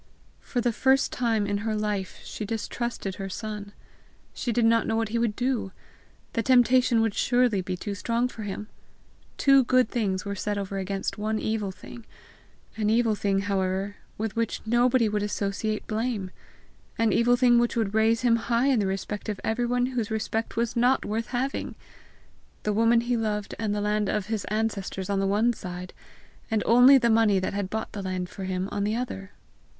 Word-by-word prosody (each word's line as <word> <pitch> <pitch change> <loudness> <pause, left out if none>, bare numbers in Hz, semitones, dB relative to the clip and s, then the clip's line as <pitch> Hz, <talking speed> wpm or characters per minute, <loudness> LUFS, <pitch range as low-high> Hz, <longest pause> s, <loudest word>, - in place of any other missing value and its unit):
For 245 - -3
the 240 -1 +1
first 265 +4 +3
time 225 -4 0
in 200 0 -1
her 220 +1 -2
life 210 -3 -2
she - - -6
distrusted 225 -2 -4
her 195 -1 -5
son. 210 0 -6 0.6
She 245 - -2
did 235 0 +2
not 230 0 +3
know 225 - 0
what 225 -1 0
he 235 +2 -1
would 230 -3 0
do! 245 -5 -1 0.6
The 230 - +1
temptation 250 -1 +4
would 225 -2 +1
surely 245 -5 +2
be 185 0 -4
too 205 +3 -4
strong 235 +5 0
for 230 - -9
him! 210 0 -5 0.7
Two 275 -1 +5
good 255 -1 +3
things 200 -5 -1
were 200 - -3
set 205 +1 -2
over 195 0 -3
against 195 +1 -3
one 215 +1 -1
evil 215 -2 -1
thing 235 +5 -11 0.7
an 210 -1 +1
evil 225 0 +3
thing, 200 -1 0
however, 195 0 -1 0.2
with 220 -1 -3
which 230 -1 -1
nobody 240 +1 +3
would 210 0 -1
associate 205 +1 -2
blame, 215 -4 -2 0.7
an 225 -3 +2
evil 240 +1 +4
thing 245 -1 +5
which 240 0 +1
would 220 -4 0
raise 220 +1 +3
him 235 -1 +4
high 235 +3 +1
in 260 -4 +3
the 200 - +1
respect 195 +3 -4
of 210 - -3
everyone 245 +2 +1
whose 250 -4 -2
respect 220 +1 -2
was 235 +1 -1
not 245 +3 +3
worth 225 +2 -2
having! 260 +2 -3 0.9
the 210 - 0
woman 230 +2 +4
he 240 +1 0
loved 210 -3 -2
and 210 -1 -1
the 205 - -1
land 210 -1 0
of 210 -2 -1
his 220 0 -3
ancestors 200 -3 -2
on 195 - +1
the 195 - +1
one 215 +5 +2
side, 180 -3 -7 0.6
and 220 -2 +1
only 245 +4 +7
the 235 -2 +2
money 220 -3 +4
that 190 +1 -2
bought 220 +1 -4
the 205 - -5
land 185 -1 -3
for 190 - -7
him 185 0 -2
on 200 - -1
the 210 +2 0
other! 215 -5 -4
220 Hz, 190 wpm, -26 LUFS, 200-235 Hz, 0.9 s, only